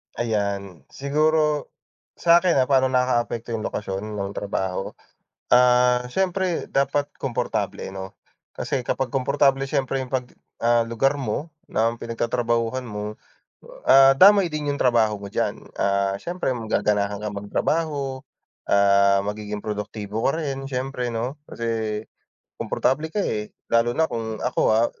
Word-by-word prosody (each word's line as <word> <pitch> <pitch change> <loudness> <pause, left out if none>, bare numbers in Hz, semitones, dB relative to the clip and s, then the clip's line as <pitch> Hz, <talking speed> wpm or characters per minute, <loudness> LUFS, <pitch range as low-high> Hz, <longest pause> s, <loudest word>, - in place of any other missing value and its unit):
Ayan, 100 -6 -2
siguro 150 +1 +1 0.5
sa'kin, 170 +1 +4
ah, 130 - +4
paano 130 -1 +5
nakakaapekto 120 -2 0
yung 110 -1 -2
lokasyon 105 +1 -4
ng 100 -1 -3
trabaho? 95 -2 -3 0.6
Ah, 125 0 +5
siyempre 185 +2 0
dapat 140 +1 +1 0.2
komportable 120 -6 -2
'no. 95 0 -8 0.4
Kasi 135 - -1
kapag 125 0 -2
komportable 135 0 +2
siyempre 135 -1 0
yung 130 - -6
'pag, 130 -1 -1 0.3
ah, 120 0 +3
lugar 135 +5 +1
mo 140 +7 -3 0.2
na 115 +1 +1
pinagtatrabahuhan 115 +1 -1
mo, 105 -3 -5 0.7
ah, 135 0 +7
damay 195 +1 +7
din 150 -2 -2
yung 140 - -4
trabaho 110 -4 +2
mo 100 - -7
diyan, - - -3
ah, 100 0 +1
siyempre 175 - -3
magaganahan 105 -3 0
kang 105 -1 -4
magtrabaho, 135 +5 -1 0.5
ah, 100 0 +4
magiging 105 0 -4
produktibo 105 0 -4
ka 140 - -1
rin 135 -2 -4
siyempre, 125 -1 -3
no. 120 +6 -3
Kasi 110 -2 -2 0.6
komportable 150 +4 0
ka, 210 - -3
eh, 105 - -2 0.2
lalo 115 +1 +3
na 160 - +4
kung 110 -1 -4
ako, - - -1
ah, 115 +2 +4
120 Hz, 130 wpm, -23 LUFS, 105-135 Hz, 0.7 s, ah